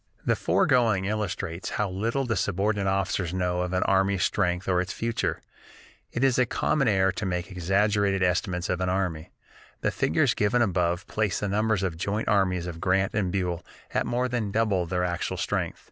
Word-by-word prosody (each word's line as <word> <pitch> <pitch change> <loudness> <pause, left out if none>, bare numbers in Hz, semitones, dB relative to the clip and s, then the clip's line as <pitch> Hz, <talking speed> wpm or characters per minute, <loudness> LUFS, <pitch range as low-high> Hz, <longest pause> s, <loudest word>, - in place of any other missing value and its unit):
The - - +3
foregoing 115 -7 +2
illustrates 95 -4 -3
how 105 - +1
little 115 +8 -1
the 115 -2 0
subordinate 100 +2 0
officers 95 -2 -1
know 90 -1 0
of 90 0 -2
an 95 0 +1
army's 95 -1 +2
strength 90 +1 0
or 90 -1 +2
its 90 - -4
future. 115 -8 -2 0.7
It 120 - -2
is 130 -2 +3
a 125 - +3
common 140 +3 +1
error 95 -3 +3
to 100 - -4
make 90 +1 -3
exaggerated 100 +2 +1
estimates 90 0 0
of 90 0 -1
an 90 - +1
army. 90 -4 -2 0.5
The - - +1
figures - - +2
given 115 +4 +2
above 90 -3 0
place 105 -4 -1
the 105 - -2
numbers 105 -1 +1
of 95 - 0
the 80 - -12
joint 100 +4 -2
armies 90 -4 +2
of 85 -1 -6
Grant 95 +1 +1
and 100 -4 0
Buell 90 -3 -2 0.3
at - - 0
more 125 +1 0
than 120 -4 -2
double 100 -4 +1
their 90 +1 -1
actual 85 -1 -2
strength. - - -2
95 Hz, 190 wpm, -26 LUFS, 90-105 Hz, 0.7 s, The